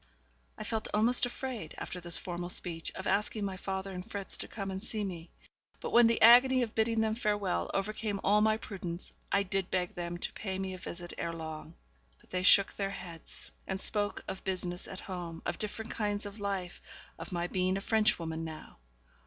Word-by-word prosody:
I -, -, -5 dB
felt 220 Hz, -1 st, -2 dB
almost 240 Hz, +4 st, +5 dB
afraid, 245 Hz, -, -5 dB
after 180 Hz, -, -5 dB
this 175 Hz, -1 st, 0 dB
formal 175 Hz, 0 st, -4 dB
speech, 170 Hz, -2 st, 0 dB
of -, -, -5 dB
asking 210 Hz, 0 st, +1 dB
my 195 Hz, -1 st, -2 dB
father 190 Hz, +1 st, -3 dB
and 180 Hz, 0 st, -5 dB
Fritz 200 Hz, -1 st, -2 dB
to -, -, -1 dB
come 195 Hz, -3 st, -4 dB
and 190 Hz, +1 st, -4 dB
see 220 Hz, -2 st, -2 dB
me; 175 Hz, -4 st, -5 dB, 0.5 s
but, -, -, -4 dB
when 235 Hz, -1 st, +8 dB
the 230 Hz, -, +2 dB
agony 250 Hz, +2 st, +8 dB
of 225 Hz, -, -4 dB
bidding 225 Hz, 0 st, +2 dB
them 220 Hz, 0 st, +2 dB
farewell 205 Hz, -, 0 dB
overcame 205 Hz, +1 st, -1 dB
all 210 Hz, +2 st, +5 dB
my 215 Hz, 0 st, +4 dB
prudence, 185 Hz, -5 st, -5 dB, 0.2 s
I 200 Hz, -, +4 dB
did 195 Hz, -1 st, -1 dB
beg 180 Hz, -1 st, 0 dB
them 175 Hz, 0 st, -4 dB
to -, -, -2 dB
pay 190 Hz, -3 st, -3 dB
me 190 Hz, -1 st, -3 dB
a 185 Hz, -, -7 dB
visit 175 Hz, 0 st, -6 dB
ere 170 Hz, -, -1 dB
long. 160 Hz, 0 st, -7 dB, 0.4 s
But -, -, -24 dB
they 180 Hz, -, 0 dB
shook 195 Hz, +1 st, +7 dB
their 195 Hz, -1 st, -1 dB
heads, 170 Hz, -4 st, -8 dB, 0.2 s
and 190 Hz, 0 st, -2 dB
spoke 205 Hz, +1 st, +1 dB
of 190 Hz, -, -5 dB
business 180 Hz, -2 st, -2 dB
at 190 Hz, -, -7 dB
home, 175 Hz, -3 st, -6 dB
of -, -, -2 dB
different 220 Hz, +2 st, -3 dB
kinds 205 Hz, -1 st, -1 dB
of 205 Hz, +1 st, -7 dB
life, 195 Hz, -3 st, -3 dB, 0.4 s
of 165 Hz, -, -7 dB
my 175 Hz, -1 st, 0 dB
being 185 Hz, +1 st, +1 dB
a -, -, -3 dB
Frenchwoman 185 Hz, -7 st, +1 dB
now. 160 Hz, -1 st, -8 dB
195 Hz, 200 wpm, -32 LUFS, 175-215 Hz, 0.5 s, when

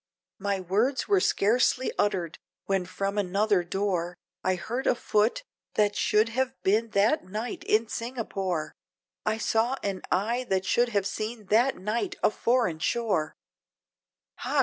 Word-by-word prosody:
My 200 Hz, -1 st, -1 dB
words 215 Hz, +9 st, 0 dB
were 400 Hz, -2 st, +4 dB
scarcely 245 Hz, -, +2 dB
uttered, 175 Hz, -5 st, -1 dB, 0.3 s
when 195 Hz, -2 st, 0 dB
from 195 Hz, +2 st, -2 dB
another 200 Hz, 0 st, +2 dB
door, 180 Hz, -1 st, -2 dB, 0.3 s
I 185 Hz, 0 st, +2 dB
heard 240 Hz, +9 st, -3 dB
a -, -, +4 dB
foot, 220 Hz, -, +1 dB, 0.3 s
that 205 Hz, -1 st, +2 dB
should 215 Hz, +2 st, +3 dB
have 260 Hz, +3 st, -1 dB
been 220 Hz, +4 st, +2 dB
that 220 Hz, +10 st, +3 dB
night 215 Hz, +5 st, -5 dB
in 225 Hz, +1 st, +2 dB
Singapore! 195 Hz, -10 st, -3 dB, 0.5 s
I 215 Hz, +1 st, +2 dB
saw 225 Hz, +4 st, +1 dB
an 195 Hz, -2 st, -2 dB
eye, 235 Hz, +6 st, 0 dB
that 190 Hz, -1 st, +1 dB
should 240 Hz, +5 st, +2 dB
have 200 Hz, -4 st, 0 dB
seen 215 Hz, +1 st, -4 dB
that 240 Hz, +5 st, +4 dB
night 210 Hz, +3 st, -2 dB
a -, -, +5 dB
foreign 230 Hz, -8 st, +1 dB
shore, 200 Hz, -6 st, 0 dB, 1.0 s
"Ha! -, -, -1 dB
210 Hz, 145 wpm, -27 LUFS, 190-235 Hz, 1.0 s, a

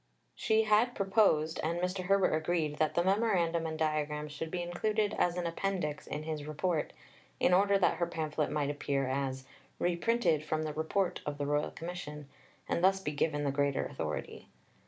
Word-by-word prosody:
She 220 Hz, 0 st, +2 dB
had 220 Hz, +3 st, +3 dB
proposed, 190 Hz, -6 st, +2 dB
and 165 Hz, +2 st, -1 dB
Mr. 180 Hz, +1 st, -2 dB
Herbert 195 Hz, 0 st, +3 dB
agreed, 155 Hz, -1 st, 0 dB
that 155 Hz, -, +1 dB
the 170 Hz, -, +3 dB
memorandum 180 Hz, -5 st, +2 dB
and 160 Hz, 0 st, -4 dB
diagrams 150 Hz, -1 st, -1 dB
should 160 Hz, +2 st, -5 dB
be 175 Hz, +1 st, -2 dB
included 210 Hz, +4 st, 0 dB
as 175 Hz, 0 st, +2 dB
an 175 Hz, -, -1 dB
appendix 170 Hz, -3 st, -2 dB
in 150 Hz, +1 st, -4 dB
his 155 Hz, -2 st, -4 dB
Report, 155 Hz, +1 st, -1 dB, 0.5 s
in 180 Hz, -, +4 dB
order 200 Hz, +2 st, +5 dB
that 190 Hz, -, +2 dB
her 170 Hz, -, 0 dB
pamphlet 155 Hz, -1 st, -2 dB
might 145 Hz, -1 st, 0 dB
appear 140 Hz, -2 st, -1 dB
as 130 Hz, 0 st, -2 dB, 0.3 s
"Reprinted 175 Hz, -2 st, +1 dB
from 155 Hz, 0 st, -1 dB
the 155 Hz, -1 st, -3 dB
Report 170 Hz, +4 st, -1 dB
of 145 Hz, -1 st, -4 dB
the 145 Hz, -, -2 dB
Royal 145 Hz, +1 st, 0 dB
Commission," 155 Hz, -4 st, -7 dB, 0.4 s
and 170 Hz, -, -1 dB
thus 195 Hz, +1 st, +5 dB
be 150 Hz, -6 st, -3 dB
given 145 Hz, 0 st, 0 dB
the 140 Hz, -, +1 dB
greater 140 Hz, 0 st, +1 dB
authority. -, -, -5 dB
160 Hz, 175 wpm, -32 LUFS, 150-185 Hz, 0.5 s, order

